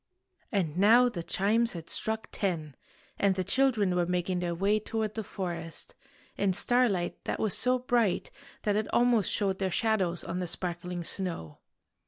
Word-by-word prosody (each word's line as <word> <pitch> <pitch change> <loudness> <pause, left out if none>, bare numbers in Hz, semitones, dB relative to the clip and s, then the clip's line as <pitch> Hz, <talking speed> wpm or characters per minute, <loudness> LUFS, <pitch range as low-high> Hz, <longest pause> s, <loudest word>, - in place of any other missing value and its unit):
And 175 -6 -1
now 235 +5 +6
the 180 -8 -5
chimes 220 +7 +1
had 165 -2 -8
struck 220 0 -2
ten, 160 -8 -2 0.4
and 200 -1 +3
the 185 - -1
children 210 -3 +2
were 175 -1 +1
making 180 0 -1
their 175 -1 -2
way 200 +4 +2
toward 215 0 -3
the 220 - -4
forest, 175 -4 -4 0.4
in 195 -2 +1
starlight 205 -5 +1
that - - -2
was 215 -3 +2
so 255 0 +4
bright 240 -6 0 0.3
that 205 -1 +1
it 215 0 0
almost 240 -4 +3
showed 195 -2 0
their 190 -1 0
shadows 185 -4 0
on 175 +2 -4
the 180 - -2
sparkling 175 0 -4
snow. 165 - -3
195 Hz, 165 wpm, -29 LUFS, 175-220 Hz, 0.4 s, now